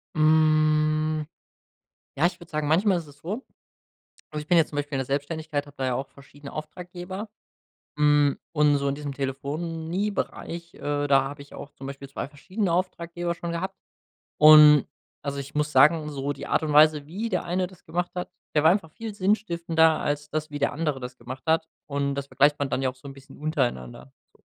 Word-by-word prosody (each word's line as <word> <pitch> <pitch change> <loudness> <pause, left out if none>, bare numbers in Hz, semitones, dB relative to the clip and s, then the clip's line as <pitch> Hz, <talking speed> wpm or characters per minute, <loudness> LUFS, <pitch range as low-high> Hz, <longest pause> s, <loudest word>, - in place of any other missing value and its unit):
Hm. 155 0 +3 0.9
Ja, 155 - +3
ich 175 0 0
würde 170 -1 -14
sagen, 150 -1 -1
manchmal 185 +5 +3
ist 165 - -6
es 145 0 -16
so 200 - -5 0.9
also 150 - -4
ich 150 - -16
bin 175 - +5
jetzt 160 - +3
zum 145 - -7
Beispiel 145 -1 -2
in - - -1
der 130 - -2
Selbstständigkeit, 145 +1 -2
habe 145 0 -16
da 130 - -1
ja 125 - 0
auch 135 +2 -3
verschiedene 140 +1 -13
Auftraggeber, 180 +6 -7 0.7
hm, 150 -1 +4
und 150 -2 +4
so 140 0 0
in 140 - 0
diesem 145 -1 -5
Telefoniebereich, 165 +6 -3
äh, 145 0 -2
da 135 -1 +5
habe 140 +1 -7
ich 140 - -16
auch 145 - -9
zum 135 - -9
Beispiel 140 0 -8
2 135 - -5
verschiedene 185 +6 -3
Auftraggeber 175 -1 -2
schon 170 0 -5
gehabt. 170 +3 -3 0.7
Und, 150 -1 +9 0.3
also, 140 -1 -4
ich 140 +1 -6
muss 150 0 0
sagen, 150 +3 +5
so 140 -1 -3
die 140 +1 -8
Art - - +1
und 150 -1 -1
Weise, 150 -1 +6
wie 200 +9 -4
der 185 - -1
eine 180 +1 0
das 185 -1 -19
gemacht 175 +2 -2
hat, 180 - -4 0.2
der 150 - +4
war 160 - +7
einfach 175 -5 -1
viel 225 +5 -7
sinnstiftender 170 -5 +2
als 145 0 -2
das, 155 0 -2
wie 145 0 -6
der 140 - +1
andere 150 -2 -1
das 125 0 -8
gemacht 130 +2 -8
hat. 160 0 +2 0.2
Und 140 -1 -1
das 140 0 -3
vergleicht 145 +1 +3
man 140 -1 -2
dann 135 - -1
ja 130 - +1
auch 130 - -10
so 130 +2 -13
'n 135 - -8
bisschen 135 0 -15
untereinander, 120 - -2 0.2
so. - - -27
150 Hz, 205 wpm, -26 LUFS, 140-170 Hz, 0.9 s, Und